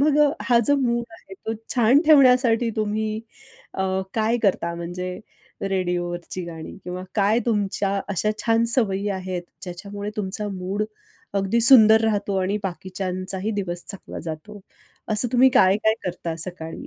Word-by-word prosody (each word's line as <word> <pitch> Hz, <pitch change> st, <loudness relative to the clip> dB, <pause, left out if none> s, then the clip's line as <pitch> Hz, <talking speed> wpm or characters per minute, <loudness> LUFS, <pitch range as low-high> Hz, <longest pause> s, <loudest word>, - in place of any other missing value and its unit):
मग 295 Hz, +1 st, +3 dB
अ, 295 Hz, -1 st, +5 dB
हा 235 Hz, 0 st, +4 dB
जो 285 Hz, 0 st, +3 dB
मूड 240 Hz, -3 st, 0 dB
आहे 195 Hz, -, -13 dB
तो 220 Hz, +3 st, -5 dB, 0.2 s
छान 245 Hz, +3 st, +5 dB
ठेवण्यासाठी 250 Hz, -5 st, +5 dB
तुम्ही 215 Hz, 0 st, -2 dB, 0.5 s
अ, 190 Hz, -, -2 dB, 0.3 s
काय 225 Hz, +1 st, +1 dB
करता? 170 Hz, -4 st, +1 dB
म्हणजे 180 Hz, +2 st, -5 dB, 0.5 s
रेडिओवरची 175 Hz, -1 st, -3 dB
गाणी 165 Hz, -2 st, -8 dB
किंवा 180 Hz, +1 st, -5 dB
काय 210 Hz, +2 st, +3 dB
तुमच्या 200 Hz, -2 st, 0 dB
अशा 200 Hz, +2 st, 0 dB
छान 230 Hz, 0 st, +2 dB
सवयी 205 Hz, -5 st, 0 dB
आहेत, 185 Hz, -2 st, -4 dB, 0.2 s
ज्याच्यामुळे 200 Hz, +3 st, -6 dB
तुमचा 205 Hz, +1 st, -3 dB
मूड 195 Hz, +2 st, -3 dB, 0.5 s
अगदी 200 Hz, +4 st, +1 dB
सुंदर 220 Hz, -3 st, +9 dB
राहतो 205 Hz, -2 st, 0 dB
आणि 195 Hz, +3 st, 0 dB
बाकीच्यांचाही 185 Hz, +1 st, -4 dB
दिवस 175 Hz, -2 st, -5 dB
चांगला 195 Hz, -, -9 dB
जातो. 170 Hz, +6 st, -7 dB, 0.5 s
असं 215 Hz, +4 st, +4 dB
तुम्ही 255 Hz, +2 st, +6 dB
काय-काय 215 Hz, -2 st, +3 dB
करता 170 Hz, -2 st, -4 dB
सकाळी? 165 Hz, -3 st, -8 dB
200 Hz, 140 wpm, -23 LUFS, 185-225 Hz, 0.5 s, सुंदर